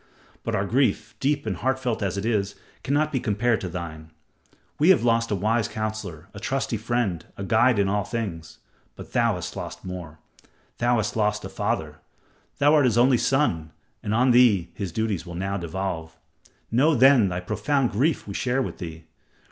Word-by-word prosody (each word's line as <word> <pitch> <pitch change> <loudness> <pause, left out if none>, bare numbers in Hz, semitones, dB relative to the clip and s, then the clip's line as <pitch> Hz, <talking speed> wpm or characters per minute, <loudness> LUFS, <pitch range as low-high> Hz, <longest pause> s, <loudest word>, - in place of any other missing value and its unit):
But - - -2
our 100 - 0
grief, 130 +6 +1
deep 145 0 0
and 100 -5 -2
heartfelt 130 +1 -1
as 100 -1 -1
it 100 - -3
is, 100 -3 0 0.3
cannot 150 +3 +1
be 130 - 0
compared 115 0 +1
to 90 - -4
thine. 80 -3 -7 0.7
We 155 +5 +4
have 190 - +6
all - - -2
lost 115 0 -1
a 105 - +1
wise 110 +3 +1
counselor, 110 -6 -5
a 100 - -8
trusty 125 +2 -1
friend, 110 -7 -1
a 100 - -5
guide 110 +4 +3
in 100 -1 +2
all 100 +1 0
things. 95 -8 -5 0.4
But - - -11
thou - - +2
hast - - -6
lost - - -7
more. 90 -4 -7 0.6
Thou 120 0 +3
hast 110 -2 -1
lost 105 -1 0
a - - -6
father. - - -2 0.6
Thou 145 +2 +4
art 150 -3 +5
his 120 -2 +2
only 125 0 +5
son, 120 - 0 0.3
and 105 - -4
on 125 +4 +4
thee 115 -8 +4
his 95 -4 -5
duties 105 -2 -2
will 85 - -7
now 95 +2 -2
devolve. 85 -2 -4 0.5
Know 145 +7 +4
then 130 -5 +6
thy 90 0 -3
profound 110 +8 0
grief 135 +7 0
we 100 - -5
share 125 +5 0
with - - -6
thee. 80 -3 -7
110 Hz, 190 wpm, -25 LUFS, 95-125 Hz, 0.7 s, have